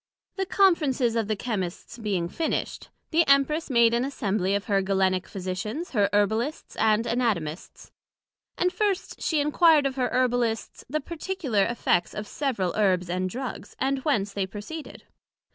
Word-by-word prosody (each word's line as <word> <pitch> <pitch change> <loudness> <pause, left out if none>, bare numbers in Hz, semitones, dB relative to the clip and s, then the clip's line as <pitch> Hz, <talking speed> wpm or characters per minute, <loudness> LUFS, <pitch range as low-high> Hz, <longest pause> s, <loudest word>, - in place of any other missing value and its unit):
The 385 -1 -2
Conferences 295 - +3
of 225 -3 0
the 215 - 0
Chymists 205 +1 -4
being 190 -6 -1
finished, 320 - -3 0.2
the 335 +1 +5
Empress 280 +4 +3
made 235 -3 +4
an 235 +1 +2
Assembly 200 -7 -1
of 200 - -2
her 195 -2 +2
Galenical 190 -1 +1
Physicians, 195 - -4
her 205 -5 +2
Herbalists 220 +8 0
and 220 +1 +3
Anatomists; 200 -11 -2 0.7
and 360 +1 +1
first 405 -3 -1
she 315 - +1
enquired 300 0 +4
of 270 -1 -1
her 250 -1 +1
Herbalists 245 -3 0
the 305 +3 -1
particular 315 - -1
effects 180 -7 0
of 210 - -4
several 210 - -2
Herbs 185 -4 +1
and 185 +1 -1
Drugs, 255 +5 -6
and 270 +1 0
whence 215 -8 0
they 195 -2 -1
proceeded? 215 +11 -8
230 Hz, 150 wpm, -26 LUFS, 195-280 Hz, 0.7 s, the